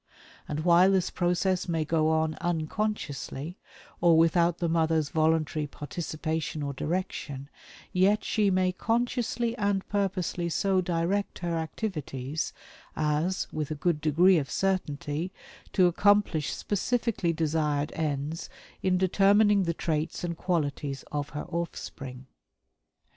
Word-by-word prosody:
And 150 +1 -2
while 175 +3 +6
this 185 -2 +1
process 180 +1 +1
may 165 -2 0
go 155 0 +2
on 160 0 +1
unconsciously, 165 -3 -3 0.4
or 170 -2 +6
without 170 +1 +4
the 175 - -1
mother's 160 -2 +2
voluntary 155 -1 +1
participation 155 +1 -4
or 140 0 -3
direction, 145 -3 -3 0.4
yet 195 +3 +3
she 210 -2 +2
may 185 -1 +2
consciously 235 +3 0
and 200 -2 0
purposely 185 -3 -1
so 190 +2 +2
direct 180 +3 -1
her 170 -1 0
activities 155 - -3 0.4
as, 155 +4 0
with 155 -2 -2
a 155 - -2
good 150 0 0
degree 170 +4 +5
of 140 -2 -4
certainty, 170 -3 -1 0.4
to 185 - +5
accomplish 180 -3 +3
specifically 210 -3 0
desired 155 -2 0
ends 150 0 -2 0.3
in 185 -1 +2
determining 200 +2 +4
the 170 - 0
traits 155 0 -2
and 170 -1 -2
qualities 145 -6 -2
of 145 -1 -2
her 150 0 -5
offspring." 135 -6 -5
165 Hz, 120 wpm, -28 LUFS, 155-185 Hz, 0.4 s, while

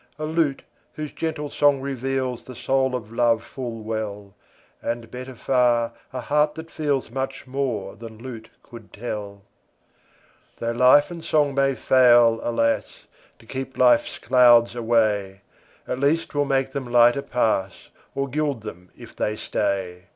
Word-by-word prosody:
A 155 - -4
lute 155 -3 0 0.3
whose 150 -1 -6
gentle 150 -3 -4
song 145 -1 +3
reveals 130 -2 -3
The 130 - -10
soul 130 +1 0
of 115 -3 -6
love 115 -1 +2
full 120 -4 -7
well; 105 -2 -5 0.5
And, 115 -1 -4
better 130 +1 -8
far, 120 -2 +2 0.2
a 130 -1 -5
heart 150 +3 +1
that 160 +1 -9
feels 145 -6 -1
Much 135 +1 -4
more 130 -7 -3
than 115 0 -10
lute 115 -2 -9
could 115 -3 -13
tell. 100 -3 -6 1.1
Tho' 115 - -2
love 125 +6 +5
and 170 -2 -8
song 145 -2 +2
may 135 0 +2
fail, 120 -3 +5
alas! 115 -1 -1 0.3
To - - -20
keep 130 +2 -6
life's 125 -1 +3
clouds 120 -1 +5
away, 110 -5 0 0.5
At 125 - -3
least 150 +4 +1
'twill 145 0 0
make 135 -1 0
them 130 -3 -5
lighter 120 +2 +5
pass, 110 -7 -1 0.3
Or 140 0 -1
gild 145 -3 -2
them 90 -4 -10
if - - -13
they 105 - -1
stay. 95 -4 -2
125 Hz, 150 wpm, -23 LUFS, 115-135 Hz, 1.1 s, love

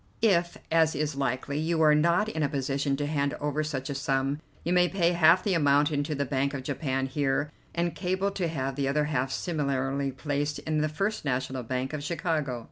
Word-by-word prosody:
If, 175 -5 +3
as 160 -1 +3
is 150 0 -1
likely, 140 +1 -1
you 160 +1 0
are 150 -1 +6
not 170 +7 +3
in 160 -8 -3
a 145 - +2
position 135 0 -1
to 145 - -1
hand 145 -1 0
over 150 +1 -1
such 140 -3 -3
a 140 - -3
sum, 135 +1 0 0.2
you 175 - 0
may 180 0 +4
pay 175 -3 +2
half 170 +1 +5
the 200 - +1
amount 145 -2 +3
into 150 +1 -1
the 140 0 -1
Bank 140 +1 -1
of 130 - -5
Japan 135 -1 -1
here, 145 +1 0 0.2
and 170 -1 0
cable 190 +3 -1
to 190 -3 -1
have 135 -4 -3
the 140 -1 -1
other 150 +2 +2
half 135 -3 -1
similarly 140 -4 -1
placed 145 +2 -2
in 155 -1 -1
the 155 - +1
First 195 +8 -2
National 130 -1 -1
Bank 130 +3 -3
of 150 -1 -4
Chicago. 155 -6 -1
145 Hz, 210 wpm, -28 LUFS, 135-165 Hz, 0.2 s, are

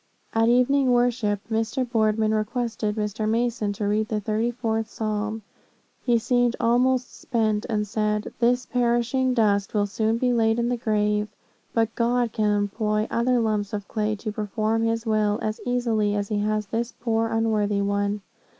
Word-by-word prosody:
"At 225 +1 +3
evening 255 +2 +3
worship, 240 -4 +1
Mr. 225 +4 0
Boardman 220 -2 +1
requested 215 -1 -1
Mr. 215 0 -2
Mason 230 -2 0
to 205 0 -3
read 215 +1 +1
the 215 -1 -1
thirty 215 +3 0
fourth 225 -2 -2
Psalm. 215 0 -3 0.6
He 240 -2 +3
seemed 245 +1 +1
almost 250 +2 +2
spent, 220 -3 0
and 210 -2 0
said, 210 0 -1
'This 245 +1 +2
poor - - -32
perishing 245 +2 +1
dust 205 -3 +1
will 205 -1 +3
soon 220 +3 0
be 250 +1 +1
laid 225 -1 +2
in 235 0 0
the 245 - +1
grave; 210 -2 0 0.5
but 225 -1 +1
God 240 0 +1
can 215 -1 +1
employ 210 +1 0
other 245 +1 +2
lumps 215 -3 -1
of 205 -1 -4
clay 215 -1 -1
to 215 +1 -5
perform 215 +1 -1
his 225 0 0
will, 215 -1 +1
as 215 0 -3
easily 225 -4 +1
as 205 -1 -2
he 210 -2 0
has 215 0 0
this 230 +3 -2
poor 225 -1 0
unworthy 215 -3 +1
one.' 200 +1 -1
220 Hz, 170 wpm, -24 LUFS, 210-235 Hz, 0.6 s, At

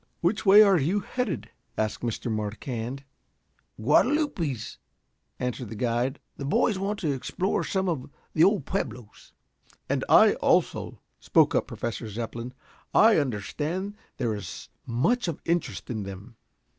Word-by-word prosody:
"Which 200 +5 0
way 205 +2 +10
are 195 -4 +5
you 180 +9 +1
headed?" 240 -1 -3 0.3
asked 110 -1 -1
Mr. 120 0 -3
Marquand. 115 +4 -4 0.8
"Guadalupes," 155 - +1 0.6
answered 125 -2 -3
the 115 - -7
guide. 120 +4 -1 0.2
"The - - -6
boys 190 - +2
want 200 +2 -1
to 155 -5 +1
explore 175 +8 -1
some 190 -1 -1
of 155 -7 -2 0.2
the 160 - +4
old 200 +2 +3
pueblos." 125 - -5 0.5
"And - - 0
I - - +7
also," - - +1 0.2
spoke - - +3
up - - +1
Professor 115 -1 -4
Zepplin. 115 +3 -5 0.4
"I 220 -5 +7
understand 150 - -3 0.2
there 120 -4 0
is 100 -2 -7 0.2
much 185 - +1
of 165 - -3
interest 170 0 -1
in 110 -3 -3
them." 100 +4 -8
140 Hz, 135 wpm, -27 LUFS, 115-190 Hz, 0.8 s, way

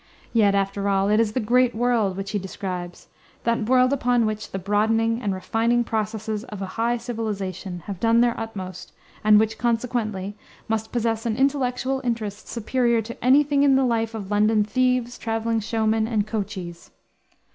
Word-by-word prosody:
Yet, 205 -4 +4
after 195 0 0
all, 195 0 +2
it 210 +1 +3
is 220 -2 +1
"the 255 - 0
great 245 +2 +2
world" 225 -5 +1
which 195 0 -4
he 205 - -1
describes, 180 -2 -6 0.3
that 230 -1 0
world 255 +1 +4
upon 245 -3 +2
which 215 0 -3
the - - -4
broadening 225 +4 +1
and 205 - -1
refining 225 +6 +1
processes 220 -1 -3
of 210 -5 -8
a 195 - -3
high 235 +1 0
civilization 205 -6 -4
have 195 -3 -6
done 230 +2 +3
their 240 0 +4
utmost, 185 -5 -7 0.3
and 210 0 +7
which, 220 0 0
consequently, 225 -5 -1 0.3
must 220 -1 -2
possess 230 -1 -1
an 220 -1 -1
intellectual 265 -1 0
interest 220 -4 -3
superior 235 0 0
to 235 +2 -9
any 265 +4 +6
thing 285 -1 +1
in 280 -1 +5
the 265 0 +3
life 225 -2 0
of 205 -2 -6
London 210 +1 +3
thieves, 250 +1 0
traveling 225 0 -1
showmen, 220 0 0
and 215 -3 0
coachees. 190 -5 -5
225 Hz, 170 wpm, -24 LUFS, 205-240 Hz, 0.3 s, and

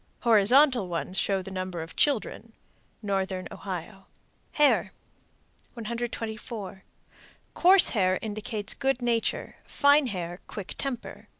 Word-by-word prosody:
Horizontal 240 +1 +4
ones 175 +1 -4
show 195 -1 0
the 195 - -9
number 185 -3 -4
of 165 - -12
children. 230 -4 0 0.5
Northern 190 -2 -2
Ohio. 195 +1 -7 0.5
HAIR. 295 -1 +3 0.8
124. 225 -4 -5 0.7
Coarse 370 +1 +6
hair 185 -4 +1
indicates 210 -1 -4
good 270 -3 -1
nature; 235 -2 -1
fine 285 0 +4
hair 175 -4 -5
quick 200 -3 -7
temper. 270 -3 -5
215 Hz, 105 wpm, -27 LUFS, 190-240 Hz, 0.8 s, Coarse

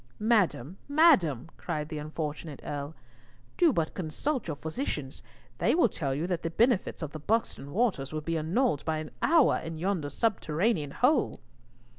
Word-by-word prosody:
"Madam, 195 - +1
madam," 275 - +4
cried 150 -1 -3
the 155 -2 -4
unfortunate 150 -1 -5
Earl, 145 +2 -5 0.6
"do 340 -3 +5
but 165 -9 -1
consult 205 - -2
your 160 - -2
physicians. 155 - -4 0.4
They - - +3
will 330 -9 +4
tell 140 -7 -2
you 155 +4 -1
that 180 -2 -1
all - - -29
the 165 - -2
benefits 220 -1 +1
of 150 - -4
the 155 - -7
Buxton 180 -6 -1
waters 195 - 0
will 155 0 -3
be 165 +2 -2
annulled 165 - +1
by 160 -1 -1
an 155 -1 -6
hour 325 -3 +5
in 165 0 -6
yonder 175 -4 -1
subterranean 170 - 0
hole." 250 - +2
165 Hz, 165 wpm, -29 LUFS, 150-230 Hz, 0.6 s, do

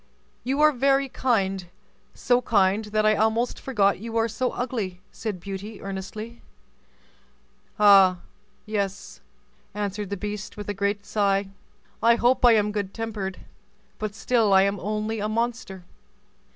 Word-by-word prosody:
"You 270 +4 0
are 305 0 +6
very 275 +1 +2
kind—so 200 +1 -2
kind 205 -2 +2
that 215 0 0
I 215 - +5
almost 220 +3 0
forgot 200 -7 +1
you 230 +2 -4
are 225 0 +2
so 245 +3 -1
ugly," 220 -8 -4
said 210 -5 -5
Beauty, 200 +3 -7
earnestly. 195 +4 -7 1.4
"Ah! 195 -3 +6 0.4
yes," 200 -2 -4 0.5
answered 205 -1 -3
the 200 - -3
beast, 210 +1 -6
with 205 -1 -7
a - - -1
great 200 +1 -2
sigh; 200 -2 0 0.5
"I 235 0 +5
hope 245 +3 +2
I 240 -2 +8
am 210 -1 +1
good 205 -2 -4
tempered, 210 -5 -4 0.6
but 215 -1 -4
still 220 -2 +2
I 190 0 +6
am 200 0 0
only 215 +3 -3
a 210 +1 -2
monster." 225 -4 -3
210 Hz, 140 wpm, -25 LUFS, 195-230 Hz, 1.4 s, I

